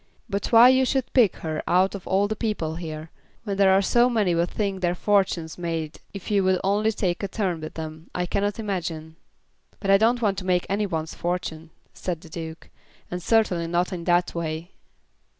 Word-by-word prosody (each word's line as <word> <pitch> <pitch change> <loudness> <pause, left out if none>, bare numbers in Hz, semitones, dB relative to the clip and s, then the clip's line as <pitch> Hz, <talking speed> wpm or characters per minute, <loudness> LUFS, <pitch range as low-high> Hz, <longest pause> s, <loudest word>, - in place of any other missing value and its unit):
But 200 -3 -2
why 235 +2 +9
you 260 0 +4
should 260 0 -1
pick 235 -8 +4
her 155 -1 -2
out 185 +2 +3
of 200 -3 -8
all 195 +2 +2
the 215 - -2
people 205 -8 -2
here, 160 -2 -7 0.3
when 200 -3 -3
there 195 -1 +5
are 195 +1 +4
so 240 +5 +4
many 210 -7 +2
would 170 +1 +1
think 195 -3 -2
their 175 -1 +1
fortunes 185 -5 0
made 165 -3 -3
if 200 +1 -7
you 200 -2 +3
would 185 -1 +2
only 205 +3 +2
take 185 -5 -1
a 200 - -1
turn 185 -5 -2
with 155 - -7
them, 160 0 -7
I 180 - 0
cannot 200 +3 -1
imagine." 170 -7 -4 0.6
"But 195 - 0
I 195 - +6
don't 235 +3 +3
want 205 -4 0
to - - -8
make 180 -1 +1
any 205 +1 0
one's 160 -3 -3
fortune," 165 -2 -4 0.2
said 175 -3 -4
the 165 - -13
Duke; 160 0 -8 0.4
"and 180 0 -3
certainly 180 -5 +2
not 175 +2 0
in 175 -2 -5
that 175 0 +2
way." 165 +1 -4
185 Hz, 205 wpm, -25 LUFS, 165-205 Hz, 0.6 s, why